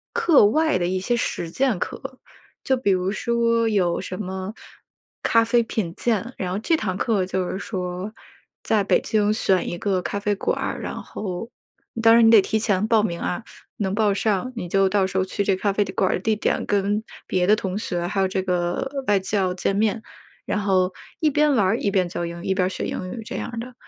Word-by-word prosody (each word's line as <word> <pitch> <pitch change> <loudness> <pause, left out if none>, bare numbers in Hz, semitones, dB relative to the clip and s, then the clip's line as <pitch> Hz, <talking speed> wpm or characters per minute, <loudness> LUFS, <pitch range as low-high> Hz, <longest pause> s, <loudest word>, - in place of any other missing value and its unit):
课 345 - +5
外 310 +6 +3
的 175 -1 0
一 185 +1 -1
些 240 +6 0
实 170 -6 -2
践 255 +1 +1
课， 265 +6 -6 0.4
就 265 -1 +2
比 205 -6 +1
如 185 +1 +1
说 230 +1 +1
有 185 -5 +1
什 185 - -5
么 190 +2 -5 0.7
咖 230 0 +4
啡 235 +1 +3
品 205 -7 -3
鉴， 235 +1 -1
然 180 -1 -3
后 195 - -1
这 325 +8 +1
堂 190 -9 -2
课 205 -3 +1
就 185 -1 -2
是 - - -3
说 185 0 -4 0.5
在 215 -2 +1
北 - - +2
京 210 -1 +1
选 190 -4 +1
一 - - -3
个 190 -1 0
咖 200 - -3
啡 205 0 0
馆 - - -1
儿， - - -3
然 - - -5
后 195 +2 -6 0.5
当 225 0 +7
然 230 0 +6
你 - - +7
得 225 -3 +8
提 220 - 0
前 205 0 +1
报 220 -2 +4
名 170 -5 -2
啊， 220 +6 -3 0.3
能 195 -2 -1
报 210 -2 +2
上 215 +4 0
你 180 -7 -5
就 195 +1 +3
到 195 0 +2
时 190 0 -4
候 185 - +2
去 200 +2 -2
这 195 -1 +2
咖 200 +1 0
啡 205 - +2
的 190 - -6
馆 190 - +1
儿 - - 0
地 220 0 +1
点 - - 0
跟 205 +1 +1 0.2
别 180 -1 0
的 210 - +6
同 190 -3 -4
学 175 -5 -2
还 195 +2 -1
有 190 - +3
这 190 0 -2
个 180 +10 -2
外 205 -1 +4
教 190 -1 0
见 195 +2 0
面， 220 +2 0 0.4
然 210 - -1
后 185 -2 +1 0.3
一 310 - +4
边 295 0 +3
玩 205 -5 +3
儿 185 - +2
一 - - 0
边 190 -3 +1
教 175 0 -4
英 170 +1 -7
语， - - -8
一 190 - +1
边 185 -1 +1
学 - - -4
英 185 0 -4
语 225 +1 -6
这 - - -5
样 230 -1 -5
的。 250 +2 -7
200 Hz, 245 characters per minute, -23 LUFS, 185-225 Hz, 0.7 s, 得